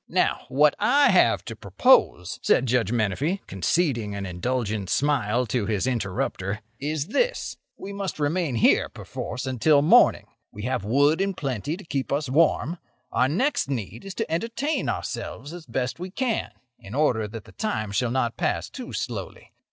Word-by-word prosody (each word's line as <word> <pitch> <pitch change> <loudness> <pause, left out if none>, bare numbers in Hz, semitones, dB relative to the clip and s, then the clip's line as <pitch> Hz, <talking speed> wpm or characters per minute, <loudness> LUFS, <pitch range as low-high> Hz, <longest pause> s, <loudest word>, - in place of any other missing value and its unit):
"Now, - - +1
what 145 +2 +4
I 280 0 +5
have 185 - +4
to - - -6
propose," - - +3
said 130 - +3
Judge 120 -4 +1
Menefee, 120 - 0
conceding 115 - 0
an 100 -1 -4
indulgent 105 +1 -2
smile 125 -2 +1
to 115 -2 -1
his 105 0 0
interrupter, 100 -3 -2 0.2
"is 150 +2 -2
this: - - 0 0.2
We 200 - -7
must 195 -5 -4
remain 150 -1 0
here, 110 - +4
perforce, 125 - -6
until 140 +3 +3
morning. 155 - +5 0.3
We 105 - -8
have 125 -3 -1
wood 145 - +3
in 195 -1 0
plenty 140 - -3
to 200 - -11
keep 140 -4 -3
us 140 -1 0
warm. 165 +3 +2 0.3
Our 125 - +3
next 235 - 0
need 115 -4 -4
is 195 -1 -8
to 225 - -3
entertain 235 - -1
ourselves 125 +4 -4
as 175 -3 -10
best 130 +4 -2
we 180 +1 -5
can, 235 +3 -1 0.3
in 100 +5 -9
order 125 -8 +2
that 110 0 -8
the - - -14
time 110 - -3
shall 115 +4 0
not 120 -1 -1
pass - - -1
too - - -8
slowly. - - -5
135 Hz, 165 wpm, -25 LUFS, 115-170 Hz, 0.3 s, I